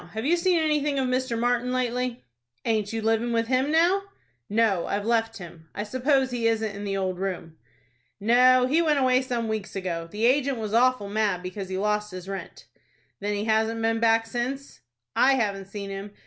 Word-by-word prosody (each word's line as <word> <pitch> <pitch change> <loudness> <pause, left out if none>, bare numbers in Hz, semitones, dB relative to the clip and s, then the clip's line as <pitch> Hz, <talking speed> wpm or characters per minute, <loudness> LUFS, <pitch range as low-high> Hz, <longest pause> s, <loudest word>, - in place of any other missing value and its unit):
Have 220 +2 -4
you 330 +5 +4
seen 355 0 +2
anything 300 -2 +1
of 265 -1 +1
Mr. 255 -2 -1
Martin, 245 +1 0
lately?" 250 -1 -2 0.4
"Aint 215 -3 0
you 225 -1 -3
living 225 +2 +1
with 230 0 +1
him 260 +3 +1
now?" 345 +5 +3 0.5
"No, 210 -4 +2
I've 205 +1 -2
left 225 -1 0
him. 165 -4 -12
I 205 - -2
suppose 260 +4 +1
he 235 -2 0
isn't 220 -2 0
in 205 +1 -6
the 195 -1 -2
old 185 -2 -2
room." 180 -4 -4 0.6
"No, 250 +4 +5
he 300 +6 +2
went 310 -3 +2
away 255 -1 +3
some 240 -3 -2
weeks 215 -3 -4
ago. 170 -3 -3
The 210 +5 -1
agent 270 +1 +2
was 215 -2 -4
awful 250 -3 +3
mad 200 -3 0
because 185 +1 -6
he 185 - -3
lost 210 +1 0
his 185 -1 -8
rent." 195 0 -7 0.5
"Then 205 +1 -2
he 205 +1 -2
hasn't 220 +1 +1
been 225 0 +1
back 225 0 +3
since?" 250 +4 -4 0.4
"I 270 +1 +5
haven't 200 -5 -1
seen 200 0 -6
him. 195 +1 -7
225 Hz, 195 wpm, -25 LUFS, 205-255 Hz, 0.6 s, No